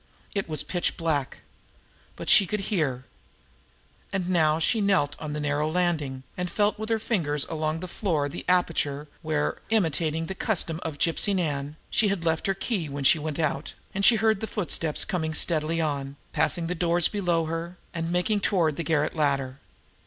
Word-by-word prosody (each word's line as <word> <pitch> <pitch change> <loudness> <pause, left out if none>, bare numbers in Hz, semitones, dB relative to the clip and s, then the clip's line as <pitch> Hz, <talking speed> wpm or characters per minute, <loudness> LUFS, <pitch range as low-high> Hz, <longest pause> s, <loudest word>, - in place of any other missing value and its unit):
It 200 -4 -2
was 155 - -1
pitch 175 -2 -1
black. 150 -5 -1 0.7
But - - -7
she 195 - +7
could 210 +1 -1
hear. 135 -10 0 1.1
And 185 -1 0
as 155 -1 +3
she 220 +6 +3
knelt 190 -8 +2
now - - -8
on 150 - -4
the 150 - -3
narrow 150 +1 0
landing, 155 -6 0
and 180 -1 -2
felt 210 +2 +1
with 220 +1 -4
her 225 - +3
fingers 160 - 0
along 155 0 -2
the 185 - -4
floor 170 -6 0
for - - -3
the - - -6
aperture, 155 -5 +1
where, 155 -2 -1
imitating 165 -6 +1
the 190 - -4
custom 175 -5 -1
of 155 -3 -4
Gypsy 175 +6 +2
Nan, 145 -4 -1 0.2
she 220 - +3
had 195 -4 -1
left 160 +2 +1
her 195 - +1
key 195 - -2
when 140 0 -4
she 155 +4 +5
went 150 -1 -3
out, 150 -2 -1 0.3
she 230 +4 +7
heard 220 -1 +2
the 220 - -3
footsteps 165 -6 -1
coming 160 -6 -2
steadily 160 0 0
on, 140 -3 -2 0.2
passing 165 +3 +1
the 175 - -1
doors 175 0 +2
below 175 -5 0
her, 165 +2 -4 0.2
and 165 0 -2
making 180 +4 +1
toward 170 -7 +2
the 170 - -1
garret 155 0 +1
ladder. 140 -3 0
165 Hz, 185 wpm, -26 LUFS, 150-185 Hz, 1.1 s, she